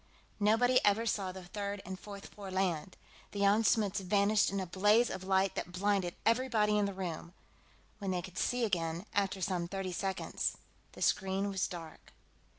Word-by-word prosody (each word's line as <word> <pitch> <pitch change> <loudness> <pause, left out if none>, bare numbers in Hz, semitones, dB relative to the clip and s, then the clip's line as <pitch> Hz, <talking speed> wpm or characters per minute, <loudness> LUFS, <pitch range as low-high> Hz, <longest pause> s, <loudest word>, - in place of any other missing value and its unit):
Nobody 225 +5 +4
ever 205 +3 +3
saw 200 -4 -1
the 185 0 -9
third 200 +2 -4
and 190 +1 -6
fourth 200 0 -9
four 200 -2 -8
land. 185 -2 -1 0.4
The 200 - -3
Jan 200 +3 +4
Smuts 210 -2 +2
vanished 200 +2 +3
in 195 - -2
a 190 - -2
blaze 205 +6 +3
of 190 0 -5
light 190 0 +2
that 175 - -4
blinded 190 -1 0
everybody 225 -3 +3
in 205 - +2
the 200 - -3
room; 175 -1 -5 0.6
when 200 -2 -3
they 180 -1 -1
could 185 - -7
see 245 -1 +1
again, 170 -2 -1
after 195 -1 0
some 180 -2 -1
thirty 195 0 -4
seconds, 190 +2 -2 0.4
the - - -4
screen 195 +1 +1
was 190 -1 0
dark. 165 -3 -10
195 Hz, 175 wpm, -33 LUFS, 185-205 Hz, 0.6 s, Nobody